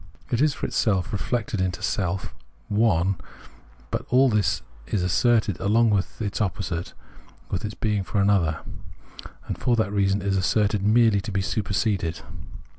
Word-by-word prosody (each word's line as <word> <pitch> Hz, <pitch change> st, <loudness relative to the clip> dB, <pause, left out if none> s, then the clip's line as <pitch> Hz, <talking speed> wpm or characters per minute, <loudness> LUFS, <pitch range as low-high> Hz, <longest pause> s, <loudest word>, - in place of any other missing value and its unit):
It 120 Hz, +1 st, +1 dB
is 150 Hz, -2 st, +3 dB
for -, -, -4 dB
itself, 105 Hz, 0 st, 0 dB
reflected 105 Hz, 0 st, -1 dB
into 90 Hz, -1 st, -2 dB
self, 95 Hz, -1 st, -2 dB, 0.4 s
one; 100 Hz, -4 st, +2 dB, 0.7 s
but -, -, -2 dB
all 130 Hz, +2 st, +5 dB
this 105 Hz, -3 st, +1 dB, 0.2 s
is 100 Hz, -4 st, -1 dB
asserted 105 Hz, +2 st, +2 dB
along 110 Hz, +3 st, +3 dB
with 100 Hz, -2 st, -1 dB
its 105 Hz, -1 st, -2 dB
opposite, 90 Hz, -3 st, -3 dB, 0.6 s
with 90 Hz, -, -2 dB
its 105 Hz, 0 st, -4 dB
being 105 Hz, -2 st, 0 dB
for 100 Hz, +2 st, -2 dB
another, 95 Hz, -6 st, +2 dB, 0.8 s
and -, -, -5 dB
for 120 Hz, -, +2 dB
that 110 Hz, -3 st, 0 dB
reason 100 Hz, -1 st, +1 dB
is 100 Hz, -1 st, +1 dB
asserted 100 Hz, +2 st, +1 dB
merely 110 Hz, 0 st, +4 dB
to 105 Hz, -, -6 dB
be 95 Hz, 0 st, 0 dB
superseded. 100 Hz, -4 st, -1 dB
100 Hz, 150 wpm, -24 LUFS, 95-110 Hz, 0.8 s, all